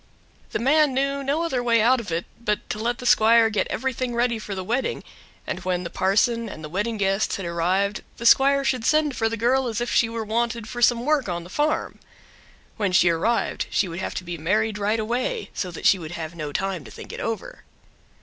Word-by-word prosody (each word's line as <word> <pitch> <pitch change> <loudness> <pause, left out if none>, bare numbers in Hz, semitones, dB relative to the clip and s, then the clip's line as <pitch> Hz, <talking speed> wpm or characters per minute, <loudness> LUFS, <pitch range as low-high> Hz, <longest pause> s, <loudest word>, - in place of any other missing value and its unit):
The - - -2
man 285 +2 +3
knew 275 +1 0
no 290 +5 0
other 265 -7 -1
way 235 -1 +3
out 245 +4 +4
of 210 -7 -7
it 165 +1 -1 0.2
but 210 -2 -1
to 215 - -4
let 240 +2 -1
the 250 - -9
squire 225 -1 +5
get 210 - 0
everything 255 -2 -2
ready 235 -1 +1
for 205 -2 -6
the 185 - -4
wedding; 240 +7 -2 0.4
and 185 - -3
when 180 -1 -2
the 170 - -6
parson 225 +4 +1
and 155 - -9
the 150 - -6
wedding 210 +6 -2
guests 195 0 +1
had 195 - -5
arrived 185 +5 0 0.2
the 235 - -7
squire 275 +3 +5
should 255 -3 0
send 300 +1 +2
for 225 -1 +1
the 230 - -3
girl 250 +3 +2
as 225 -3 -2
if 240 - -2
she 230 - +3
were 225 -1 -4
wanted 235 0 -1
for 240 +2 -6
some 240 0 +3
work 295 -7 +1
on 170 -1 -3
the 175 - -13
farm. 300 +6 -1 0.8
When 205 -4 0
she 175 -1 +5
arrived 215 +9 0
she 200 - +1
would 170 +1 -6
have - - -4
to - - -3
be 175 -1 -6
married 210 +6 0
right 210 +2 +1
away, 250 - -2
so 185 - -3
that 170 - -8
she 195 - +5
would 160 0 -7
have 160 -1 -5
no 155 -3 -5
time 190 0 -2
to - - -12
think - - -10
it - - -6
over. 230 - -5
225 Hz, 230 wpm, -24 LUFS, 190-245 Hz, 0.8 s, squire